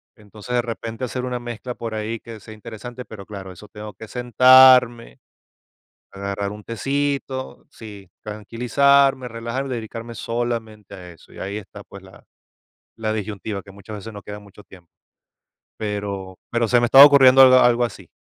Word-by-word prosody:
Entonces, 105 +2 -10
de 120 - +2
repente, 115 0 -7
hacer 125 +1 -4
una 125 -1 -3
mezcla 120 +1 -7
por 115 -2 -6
ahí, 110 +1 -4
que 115 -2 -11
sea 110 +2 -12
interesante, 115 +3 -10
pero 100 -3 -11
claro, 95 -2 -9
eso, 105 +4 -14
tengo 105 0 -10
que 110 - -11
sentarme, 125 - +5 0.9
agarrar 100 0 -4
un 105 0 -10
tecito 135 +2 -3
sí, 100 -7 -12
tranquilizarme, 125 +5 +1
relajarme 120 +4 -5
y - - -2
dedicarme 115 +1 -8
solamente 115 -3 -5
a 90 -1 -11
eso, 85 - -19
y - - -12
ahí 100 +2 -5
está, 100 0 -11
pues, 100 -1 -14
la 95 0 -17 0.7
la 110 -1 -3
disyuntiva, 105 -1 -5
que 100 - -16
muchas 100 +2 -10
veces 110 +2 -9
no 100 - -9
queda 105 +1 -9
mucho 105 0 -16
tiempo. 90 -4 -18 0.9
Pero 100 -3 -5
pero 115 -1 0
se 120 -1 +3
me 120 - +2
estaba 135 +4 +9
ocurriendo 135 -2 +7
algo 130 -1 +7
algo 120 -1 +3
así. 120 - -7
115 Hz, 170 wpm, -21 LUFS, 105-125 Hz, 0.9 s, estaba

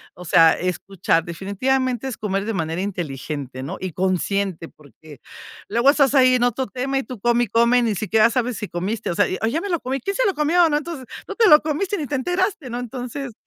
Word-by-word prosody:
O 180 - -10
sea, 165 -1 +5
escuchar 180 -2 -1
definitivamente 245 +8 -1
es 255 - -5
comer 195 -1 -2
de 225 - -2
manera 165 -1 -2
inteligente, 145 -8 -5
¿no? 135 - -5
Y 185 -1 -4
consciente, 185 0 -1
porque 150 0 -16 0.5
luego 235 +5 +3
estás 280 -1 +3
ahí 255 -1 +5
en 245 - +1
otro 245 +2 0
tema, 260 +5 -2
y - - -3
tú 245 0 -9
come 240 +2 +2
y - - -14
come, 235 +3 +3
ni 220 -3 0
siquiera 215 +3 +3
sabes 245 -2 -1
si 210 - -5
comiste, 190 +4 -3
o - - -3
sea, 205 - +3 0.2
o: 225 - +1
"ya 275 +8 0
me 405 - -5
lo 340 -2 0
comí". 265 +2 -3
"¿Quién 395 +11 -3
se - - +1
lo 395 - +2
comió?", 330 +3 +3
¿no? 295 - +2
Entonces, 300 -3 -6 0.2
tú - - -6
te 445 -5 +4
lo 300 - +8
comiste 315 +7 -2
y - - -5
ni 295 - -4
te 290 - -2
enteraste, 355 +1 -1
¿no? 240 +1 -4
Entonces, 245 +1 -6
235 Hz, 230 wpm, -21 LUFS, 185-270 Hz, 0.5 s, lo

